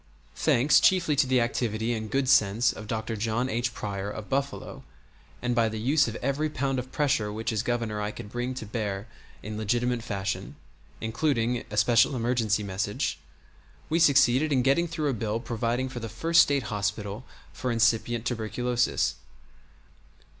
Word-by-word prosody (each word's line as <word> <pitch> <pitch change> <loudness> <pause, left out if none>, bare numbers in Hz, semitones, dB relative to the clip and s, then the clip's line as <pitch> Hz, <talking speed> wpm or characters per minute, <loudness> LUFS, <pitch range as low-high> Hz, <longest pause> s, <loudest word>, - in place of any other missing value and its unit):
Thanks 130 +6 +4
chiefly 175 -5 +3
to 135 -1 +3
the 130 -1 +3
activity 115 -1 -1
and 110 -1 -4
good 135 +2 0
sense 115 -2 +4
of 110 - -9
Dr. 110 0 -3
John 115 +4 -1
H. 120 +2 -1
Pryor, 100 -3 -4
of 105 +2 -8
Buffalo, 140 +1 -3 0.6
and 125 0 +1
by 115 -1 +2
the 110 0 -5
use 140 +6 +3
of 115 - -4
every 140 +4 0
pound 135 -2 -1
of 130 +1 -7
pressure 130 -8 +1
which 110 +2 -3
as 110 -2 0
Governor 115 -3 -2
I 105 - -1
could 105 -1 -9
bring 120 +2 -3
to 120 - -6
bear 105 -2 -3 0.4
in 105 0 -5
legitimate 120 +3 0
fashion 100 -4 -4 0.5
including 120 0 0
a 105 - -6
special 120 +5 +4
emergency 115 -3 0
message 100 +6 -2 0.7
we 165 - +3
succeeded 140 -1 +4
in 130 -3 +3
getting 140 +6 +3
through 155 -3 -2
a - - -2
bill 110 -1 -2
providing 120 +2 -1
for 130 -2 -6
the 115 -1 -5
first 165 +10 +4
State 140 -2 +2
hospital 105 +2 -3 0.3
for 125 - -3
incipient 115 0 +1
tuberculosis. 120 - 0
120 Hz, 165 wpm, -27 LUFS, 110-130 Hz, 0.7 s, Thanks